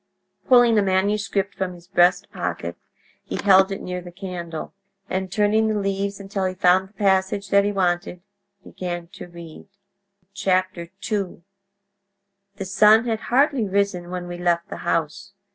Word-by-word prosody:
Pulling 240 -3 +6
a - - +3
manuscript 200 +1 0
from 185 -1 -3
his 170 -1 -16
breast 175 0 +3
pocket - - -4 0.5
he - - -6
held 190 -1 +5
it 195 - -5
near 180 0 -4
the 175 0 -11
candle, 175 -3 -7 0.3
and 190 -1 -3
turning 215 +2 +2
the 215 -1 0
leaves 195 0 -2
until 195 -1 -3
he 185 0 -2
found 185 +1 +3
the - - -30
passage 195 0 +1
that 200 0 +5
he 205 - +1
wanted, 180 -2 -1 0.4
began 175 -2 -5
to - - -10
read. 170 0 -12 0.8
II 185 +1 -2 1.1
"...The 195 -1 -5
sun 210 +4 +5
had 225 -2 -1
hardly 260 -4 +2
risen 195 -3 0
when 180 -1 -5
we 175 0 -7
left 170 -1 0
the - - -6
house. 165 +3 -2
190 Hz, 150 wpm, -23 LUFS, 180-200 Hz, 1.1 s, Pulling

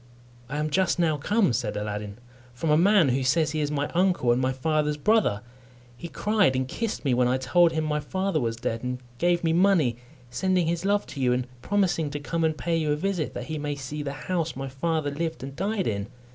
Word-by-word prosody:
"I 150 - -3
am 155 0 -1
just 185 +4 +2
now 160 -3 +2
come," 195 - +2
said 115 -3 -2
Aladdin, 105 0 -4 0.4
"from 155 +5 -1
a - - +6
man 185 -2 +5
who 130 +2 +1
says 155 +4 +2
he 155 0 -1
is 145 - 0
my 145 -1 -1
uncle 175 -8 +2
and 120 +2 +2
my 130 0 +1
father's 150 +2 0
brother. 195 - +2 0.5
He 125 - -7
cried 205 -5 +1
and 130 0 0
kissed 225 - -4
me 135 - +3
when 125 0 +3
I 125 +1 +2
told 165 +6 +3
him 160 0 0
my 150 -1 0
father 185 +3 -1
was 115 -1 -1
dead, 115 0 -3
and 125 0 -3 0.2
gave 175 0 +2
me 165 -1 +2
money, 170 -10 +3 0.3
sending 185 +5 +1
his 170 +2 -1
love 205 +1 +2
to 140 - -9
you, 125 -1 +3
and 125 0 -1 0.2
promising 180 -4 +1
to 145 +1 -4
come 165 +3 -2
and 160 -1 +1
pay 170 +1 0
you 155 -2 0
a - - +2
visit, 180 0 -2
that - - -4
he 155 -1 -4
may 145 0 -2
see 145 +2 -5
the 140 -1 -4
house 170 -3 -1
my 135 +1 -5
father 150 +2 -1
lived 160 0 -3
and 135 0 -7
died 200 +3 -1
in." 100 -2 -2
150 Hz, 230 wpm, -26 LUFS, 130-175 Hz, 0.5 s, a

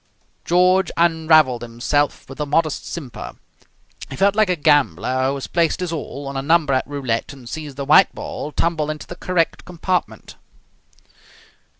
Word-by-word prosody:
George 180 +1 +3
unravelled 160 -6 +3
himself 120 +5 -1
with 135 - -11
a 150 - -1
modest 155 +1 0
simper. 140 -8 -7 0.8
He - - -7
felt 200 +6 +2
like 215 -3 +3
a 180 - +2
gambler 130 - +2
who 135 - -1
has 135 - -5
placed 170 -2 0
his 180 -2 -3
all 145 -3 -6
on 140 - -6
a 135 - -1
number 155 -1 +2
at 130 - 0
roulette 135 -3 -3
and 130 -3 -13
sees 150 +1 -7
the 140 0 -5
white 155 +7 +5
ball 150 - -6
tumble 155 -1 -1
into 155 0 -5
the 175 - -9
correct 175 -2 -1
compartment. 180 +1 -3
150 Hz, 165 wpm, -20 LUFS, 135-170 Hz, 0.8 s, white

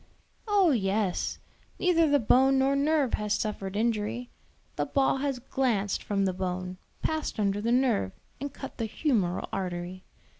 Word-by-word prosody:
"Oh 400 -5 +4
yes; 195 -5 0 0.4
neither 335 -3 +3
the 285 - +5
bone 265 +3 +4
nor 270 +1 +3
nerve 285 -2 +2
has 210 0 +1
suffered 205 -3 -3
injury; 230 +2 -1 0.4
the - - -1
ball 270 -1 +2
has 275 -1 -1
glanced 240 -6 0
from 200 -1 0
the 190 - 0
bone, 185 0 -4 0.2
passed 315 -7 -1
under 200 0 +1
the 230 +2 0
nerve, 245 - +2 0.3
and 285 +2 -4
cut 270 -1 -9
the 225 - -1
humeral 210 - 0
artery. 180 0 -4
230 Hz, 150 wpm, -28 LUFS, 195-270 Hz, 0.4 s, the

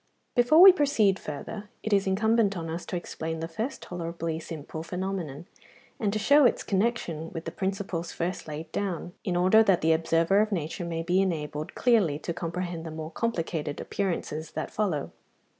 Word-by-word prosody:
Before 245 +6 +5
we 385 +1 +12
proceed 275 - +2
further, 200 +8 -7
it 220 - -1
is 195 -1 +3
incumbent 210 +1 +2
on 165 -1 -4
us 170 +2 -5
to - - -3
explain 160 -2 -4
the 165 - -3
first 220 +11 -4
tolerably 165 -2 -4
simple 160 -1 -7
phenomenon, 170 -3 -4 0.5
and 205 -3 +1
to 215 - -1
show 285 +8 +5
its 245 - +3
connexion 190 -6 -1
with 165 - -6
the 165 - -4
principles 190 -2 -3
first 180 +1 -3
laid 155 +1 -6
down, 180 -3 -3
in 180 - -1
order 185 +5 +6
that 195 -5 +3
the 160 +1 +4
observer 165 +4 +2
of 215 0 0
nature 170 -1 -3
may 165 -1 -3
be 180 +3 +2
enabled 155 -4 -3
clearly 215 - +3
to 165 - -4
comprehend 175 0 -4
the 165 - -6
more 155 0 -6
complicated 165 -8 -2
appearances 165 -5 -3
that 155 - -4
follow. 180 -10 -1
175 Hz, 175 wpm, -27 LUFS, 160-205 Hz, 0.5 s, we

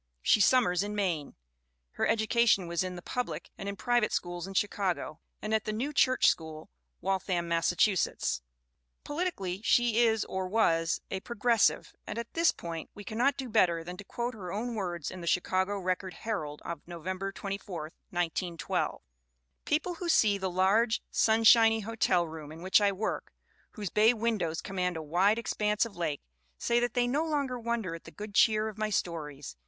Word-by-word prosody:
She 210 - +4
summers 200 -7 +4
in 205 +1 -3
Maine. 175 -8 -1 0.6
Her - - 0
education 225 -3 +3
was 170 +1 -1
in 185 -1 -4
the 175 - -9
public 170 -11 -4
and 195 - -5
in 200 - -4
pri 240 +4 +2
vate 215 - 0
schools 175 0 -3
in 195 - -8
Chicago, 190 -6 -1 0.2
and 215 +1 -2
at 220 -1 +1
the 215 - -1
New 255 +8 -2
Church 255 -2 +4
School, 160 -1 -1 0.3
Waltham, 185 -2 -1
Massachusetts. 170 - +1 0.6
Politically 290 - -3
she 240 -1 +3
is, 225 -2 +3
or 190 0 -3
was, 165 -6 +2
a 190 - -2
Progressive; 235 +1 +1
and - - -5
at 235 0 -5
this 335 0 +4
point 165 -1 -7
we 205 - -9
cannot 240 +7 +1
do 265 - -4
better 180 -7 +2
than 180 +2 -7
to 200 - -8
quote 240 +4 -4
her 185 -6 -7
own 235 +5 -3
words 175 -7 -3
in 185 - -8
the 170 - -7
Chicago 185 +3 +1
Record 185 -1 -2
Herald 155 -10 -4
of 170 -3 -5
November 185 +3 -4
24, 195 -3 -5 0.3
1912: 175 -1 -2 0.6
"People 325 +4 0
who 345 0 -5
see 205 -10 +4
the 190 0 -1
large, 200 +6 +2
sunshiny 225 0 +5
hotel 195 -5 +1
room 155 -2 -8
in 165 +2 -10
which 190 +3 +4
I 200 -1 +4
work, 200 +3 -3 0.4
whose 205 -6 -5
bay 220 +3 +5
windows 215 -8 -1
command 180 -3 -2
a 160 - -5
wide 185 +8 +3
expanse 210 -2 0
of 230 - -9
lake, 160 -5 -2 0.4
say 235 0 +2
that 240 0 -1
they 245 -1 +3
no 275 +6 +1
longer 285 -6 -1
wonder 230 -6 -2
at 165 - -9
the - - -9
good 210 0 -8
cheer 215 -2 +4
of 215 -1 -7
my 215 0 0
stories. 150 - -3
200 Hz, 180 wpm, -30 LUFS, 175-225 Hz, 0.6 s, sunshiny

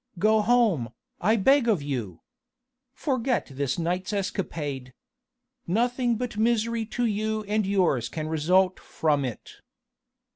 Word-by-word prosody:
Go 215 +4 +3
home, 210 - +2 0.3
I 215 +5 +3
beg 250 +5 +4
of 200 -10 +2
you! 120 - -4 0.7
Forget 260 -3 -1
this 135 -1 -1
night's 180 +3 -2
escapade! 150 - -3 0.7
Nothing 240 +5 +1
but 240 -1 -4
misery 230 0 +1
to 240 +2 -1
you 215 0 -1
and 210 0 0
yours 175 - +1
can 155 -1 -4
result 180 +4 +2
from 150 -3 0
it." 125 -4 -7
200 Hz, 120 wpm, -26 LUFS, 155-230 Hz, 0.7 s, beg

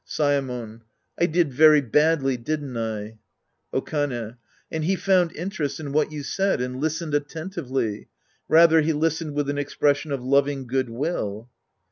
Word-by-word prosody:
Saemon. 125 -6 -2 0.4
I 170 - +4
did 165 -4 +1
very 155 +2 +7
badly, 145 +1 +2
didn't 140 +1 -4
I? 110 -1 -4 0.5
Okane. 130 -5 -2 0.3
And 160 -1 -2
he 190 +5 +1
found 185 -3 +2
interest 170 -5 -3
in 145 -3 -5
what 155 +1 +1
you 150 -1 -5
said 195 +5 0
and 125 +1 -3
listened 160 0 -2
attentively. 145 - -3 0.4
Rather 160 0 +6
he 160 +1 +1
listened 160 0 -1
with 145 -1 0
an 145 0 -1
expression 145 +1 0
of 135 -3 -3
loving 140 +1 +1
good 130 0 -1
will. 115 - -3
145 Hz, 145 wpm, -24 LUFS, 125-160 Hz, 0.5 s, very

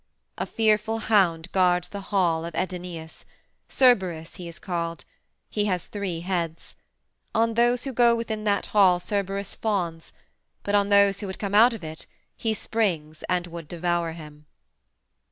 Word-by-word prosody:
A - - -2
fearful 220 0 +1
hound 185 -6 +2
guards 180 -2 +2
the 200 - -6
hall 180 -5 +1
of 170 -1 -6
Aidoneus: 175 -3 -5 0.5
Cerberus 185 -11 +2
he 175 - -7
is 170 - -9
called; 170 -2 -4 0.4
he 210 -1 -1
has 185 -4 -1
three 190 -5 -4
heads. 170 -3 -3 0.6
On 225 +1 +2
those 240 +2 +2
who 270 - -4
go 235 -1 +5
within 220 -2 -3
that 200 -1 +1
hall 190 -4 +4
Cerberus 200 +1 -3
fawns, 175 -7 -2 0.5
but 205 - -2
on 200 0 +3
those 200 -1 +5
who 205 - -5
would 190 - -6
come 200 -1 -4
out 230 +4 +6
of 225 - -8
it 160 0 -8 0.3
he 220 -1 -1
springs 165 -10 -2
and 180 -1 +1
would 170 -2 -8
devour 170 0 -1
them. 150 -2 -12
190 Hz, 155 wpm, -25 LUFS, 170-210 Hz, 0.6 s, out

